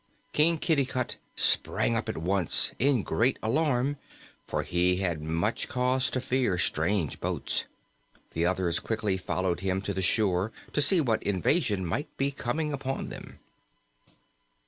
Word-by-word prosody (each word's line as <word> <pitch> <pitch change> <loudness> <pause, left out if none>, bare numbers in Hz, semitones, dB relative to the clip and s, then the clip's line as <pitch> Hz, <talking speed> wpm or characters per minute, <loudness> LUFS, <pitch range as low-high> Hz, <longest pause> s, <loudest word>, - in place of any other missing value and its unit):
King 165 +2 +3
Kitticut 135 -6 0 0.2
sprang 115 - +3
up 115 - -2
at - - -3
once, 90 +1 +3
in 130 -4 +2
great 125 +3 +1
alarm, 135 +2 +1 0.5
for - - -2
he 90 +1 +1
had 90 -5 -2
much 80 +8 -1
cause 130 +1 +1
to 130 - -1
fear 125 -7 0
strange 85 0 0
boats. - - -2 0.7
The 80 - -1
others 90 -2 0
quickly 105 -3 -1
followed 95 -1 -2
him 95 0 -1
to 100 - -3
the 95 - -2
shore 95 +1 +2 0.2
to 150 - +2
see 165 +5 +4
what 115 -6 +1
invasion 100 - +1
might 95 - -2
be 140 +1 +1
coming 145 +4 -2
upon 135 -1 -3
them. - - -10
110 Hz, 145 wpm, -28 LUFS, 90-135 Hz, 0.7 s, see